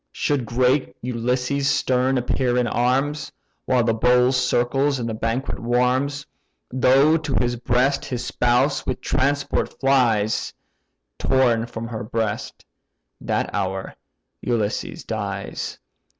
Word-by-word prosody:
Should 140 -6 -1
great 125 +4 +1
Ulysses 125 +3 0
stern 130 +1 +1
appear 125 0 0
in 125 - +2
arms, 135 +5 0 0.4
While 125 -2 +3
the 115 -1 +2
bowl 125 +2 +3
circles 130 +2 +1
and 120 -2 -3
the 115 - -3
banquet 115 +5 -2
warms; 125 +4 0 0.5
Though 135 +5 +4
to 150 -4 -3
his 120 0 +1
breast 125 +3 +1
his 125 -2 -4
spouse 125 +4 +1
with - - -3
transport 140 +1 -1
flies, 120 -6 +2 0.7
Torn 120 -4 +2
from 115 -1 -6
her 110 -3 -5
breast, 110 -1 -3 0.6
that - - -2
hour, 95 -1 -3 0.5
Ulysses 110 -4 -2
dies. - - -4
125 Hz, 120 wpm, -22 LUFS, 115-135 Hz, 0.7 s, Though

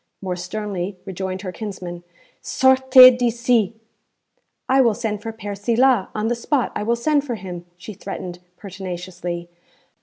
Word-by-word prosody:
More 185 -2 -3
sternly 190 0 -4
rejoined 190 0 -5
her 185 - -4
kinsman, 180 -2 -7 0.4
'Sortez 260 -1 +7
d'ici!' 235 -3 +1 0.9
'I 265 +1 +4
will 230 -4 +3
send 210 -1 -3
for 225 - -5
Père 205 -2 -6
Silas; 235 +1 +2
on 215 +1 -1
the 240 - +1
spot 250 +3 -1
I - - -2
will 230 +3 +1
send 290 +4 +1
for 250 -5 -3
him,' 180 -4 -8
she 180 +4 -9
threatened 180 -2 -7 0.2
pertinaciously. 180 -3 -6
205 Hz, 145 wpm, -21 LUFS, 185-240 Hz, 0.9 s, Sortez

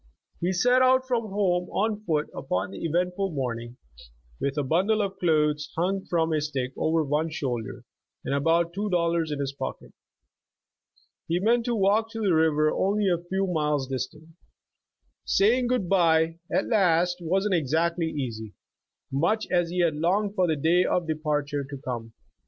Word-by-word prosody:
He 175 +2 0
set 245 +8 +3
out 260 0 +4
from 235 -3 0
home 180 -3 0
on 210 +1 -1
foot 155 -3 0
upon 95 -6 -2
the 100 - -8
eventful 180 +4 0
morning, 120 -3 -4 0.6
with 140 +1 -2
a 145 - +1
bundle 185 +10 +1
of 195 -2 -2
clothes 150 -4 +1
hung 190 +3 0
from 165 -2 +1
a 155 - +1
stick 135 -4 -3
over 160 0 +1
one 150 +3 0
shoulder, 125 -7 -4 0.4
and - - -1
about 165 +4 +2
two 205 +3 -2
dollars 170 -3 +1
in 145 - -3
his 140 -1 -2
pocket. - - -6 1.3
He 170 +2 0
meant 230 +4 +2
to 240 - 0
walk 210 +2 +2
to 225 - -5
the 200 -5 +2
river 155 -1 +3
only 200 +1 +1
a 175 -2 +1
few 195 +1 0
miles 150 -6 0
dis 130 -1 -2
tant. 155 +2 -18 0.9
Saying 240 +5 +3
good 245 -7 0
bye, 165 -3 +3
at - - +1
last, 180 -5 +2
wasn't 190 +4 0
exactly 165 +2 +1
easy, 115 -8 -5 0.6
much 170 +11 +1
as 175 -2 +2
he 180 +1 0
had 165 -3 +2
longed 195 +6 +1
for 185 -4 +2
the 160 - +1
day 165 +5 +3
of 180 -1 0
departure 150 -2 -1
to 140 +1 -8
come. 120 -4 -6
170 Hz, 170 wpm, -26 LUFS, 150-195 Hz, 1.3 s, out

